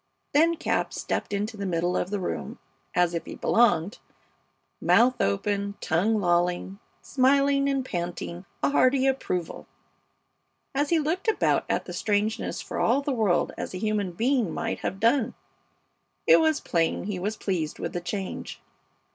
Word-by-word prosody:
Then 330 Hz, +3 st, +4 dB
Cap -, -, -1 dB
stepped -, -, -3 dB
into 210 Hz, +2 st, -2 dB
the 200 Hz, -, -4 dB
middle 175 Hz, 0 st, 0 dB
of 180 Hz, -, -1 dB
the 205 Hz, 0 st, -2 dB
room 180 Hz, -, -4 dB, 0.4 s
as 175 Hz, -1 st, +3 dB
if 170 Hz, -, -2 dB
he -, -, -7 dB
belonged, 200 Hz, -4 st, +2 dB, 0.8 s
mouth 245 Hz, +2 st, +4 dB
open, 200 Hz, -, 0 dB
tongue 210 Hz, +7 st, +1 dB
lolling, 175 Hz, +1 st, 0 dB, 0.2 s
smiling 275 Hz, +1 st, +3 dB
and 270 Hz, -2 st, 0 dB
panting 175 Hz, -1 st, -4 dB, 0.2 s
a -, -, +3 dB
hearty 265 Hz, -1 st, +3 dB
approval, 185 Hz, -11 st, -2 dB, 1.1 s
as 285 Hz, +1 st, 0 dB
he 335 Hz, -, +3 dB
looked 320 Hz, +7 st, -1 dB
about 445 Hz, -, +2 dB
at -, -, 0 dB
the -, -, -7 dB
strangeness 210 Hz, +1 st, -1 dB
for -, -, -5 dB
all 280 Hz, -, +2 dB
the 280 Hz, -, -1 dB
world 210 Hz, -8 st, +1 dB
as -, -, -5 dB
a -, -, -3 dB
human 205 Hz, -2 st, -1 dB
being 235 Hz, -1 st, +1 dB
might -, -, -3 dB
have 190 Hz, -, -4 dB
done. 235 Hz, +2 st, +2 dB, 0.9 s
It -, -, +7 dB
was 315 Hz, -2 st, +2 dB
plain 165 Hz, -1 st, 0 dB
he 190 Hz, -1 st, -3 dB
was 210 Hz, +4 st, -3 dB
pleased 165 Hz, -6 st, -2 dB
with -, -, -4 dB
the 175 Hz, -, -3 dB
change. 190 Hz, +2 st, -5 dB
210 Hz, 155 wpm, -26 LUFS, 180-265 Hz, 1.1 s, It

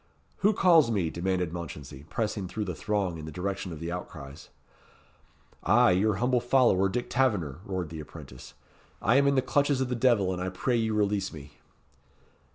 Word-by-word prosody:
"Who 210 Hz, +2 st, +3 dB
calls 165 Hz, -, +5 dB
me?" 95 Hz, -8 st, 0 dB
demanded 90 Hz, -1 st, -1 dB
Mounchensey, 75 Hz, -4 st, -8 dB
pressing 105 Hz, -4 st, -2 dB
through 105 Hz, +3 st, -4 dB
the 90 Hz, -, -3 dB
throng 95 Hz, -2 st, -2 dB
in 75 Hz, -, -7 dB
the 80 Hz, -, -7 dB
direction 95 Hz, +3 st, -4 dB
of 80 Hz, -, -7 dB
the 85 Hz, +1 st, -4 dB
outcries. 75 Hz, -5 st, -8 dB, 1.1 s
"I, 120 Hz, +4 st, +4 dB
your 100 Hz, +3 st, +2 dB
humble 125 Hz, +5 st, +1 dB
follower, 120 Hz, -6 st, +3 dB
Dick 120 Hz, +5 st, -3 dB
Taverner," 100 Hz, -, 0 dB
roared 95 Hz, -4 st, -3 dB
the 80 Hz, 0 st, -7 dB
apprentice; 65 Hz, -3 st, -11 dB, 0.4 s
"I 120 Hz, +6 st, +3 dB
am 140 Hz, 0 st, +4 dB
in 140 Hz, -, +3 dB
the 130 Hz, -, +2 dB
clutches 145 Hz, -1 st, +1 dB
of 130 Hz, -1 st, -1 dB
the 125 Hz, -, -1 dB
devil, 115 Hz, -7 st, +2 dB
and 90 Hz, -, -4 dB
I 95 Hz, -, -2 dB
pray 120 Hz, +7 st, -1 dB
you 110 Hz, -2 st, 0 dB
release 100 Hz, -2 st, 0 dB
me." 70 Hz, -2 st, -11 dB
100 Hz, 180 wpm, -28 LUFS, 85-120 Hz, 1.1 s, calls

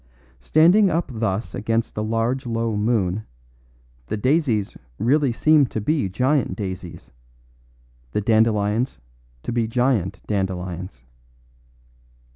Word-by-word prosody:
Standing 175 Hz, -, +5 dB
up 165 Hz, -3 st, -1 dB
thus 110 Hz, -1 st, -2 dB
against 115 Hz, +2 st, -1 dB
the 105 Hz, -, -3 dB
large 115 Hz, +4 st, -1 dB
low 115 Hz, -1 st, -1 dB
moon, 105 Hz, -2 st, 0 dB, 0.8 s
the -, -, -2 dB
daisies 125 Hz, -4 st, +1 dB, 0.2 s
really 135 Hz, +4 st, +2 dB
seemed 150 Hz, +3 st, +4 dB
to -, -, -3 dB
be 135 Hz, -1 st, 0 dB
giant 125 Hz, +1 st, +1 dB
daisies, 95 Hz, -3 st, -7 dB, 1.0 s
the -, -, 0 dB
dandelions 110 Hz, +2 st, +2 dB, 0.5 s
to -, -, -3 dB
be 115 Hz, -1 st, 0 dB
giant 115 Hz, -6 st, 0 dB
dandelions. 90 Hz, -, -3 dB
115 Hz, 105 wpm, -22 LUFS, 100-130 Hz, 1.0 s, Standing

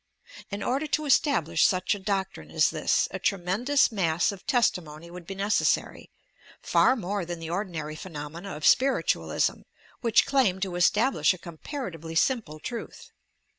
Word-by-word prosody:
In 200 Hz, 0 st, -4 dB
order 275 Hz, +5 st, -1 dB
to 305 Hz, +1 st, 0 dB
estab 280 Hz, -, +3 dB
lish 165 Hz, 0 st, +1 dB
such 185 Hz, +1 st, +2 dB
a 205 Hz, -, -5 dB
doctrine 190 Hz, -, -3 dB
as 80 Hz, -, +2 dB
this, -, -, +1 dB
a -, -, -5 dB
tremendous 205 Hz, +11 st, +1 dB
mass 175 Hz, -5 st, +1 dB
of 195 Hz, -2 st, -12 dB
testi 240 Hz, -, +2 dB
mony 155 Hz, +2 st, -12 dB
would 175 Hz, -1 st, -10 dB
be 195 Hz, -, -6 dB
necessary, 200 Hz, +2 st, 0 dB, 0.3 s
— -, -, -24 dB
far 260 Hz, -, +5 dB
more 205 Hz, -3 st, -3 dB
than 175 Hz, 0 st, -5 dB
the 165 Hz, 0 st, -7 dB
ordinary 170 Hz, -5 st, -4 dB
phenomena 165 Hz, +3 st, -7 dB
of 155 Hz, -, -5 dB
spiritualism, 270 Hz, +2 st, +2 dB, 0.4 s
which 230 Hz, -3 st, +3 dB
claim 250 Hz, -10 st, +2 dB
to 190 Hz, -2 st, -2 dB
establish 205 Hz, +3 st, +3 dB
a -, -, -12 dB
comparatively 170 Hz, -, -7 dB
simple 165 Hz, -, 0 dB
truth. 235 Hz, +7 st, -7 dB
190 Hz, 160 wpm, -27 LUFS, 165-230 Hz, 0.4 s, far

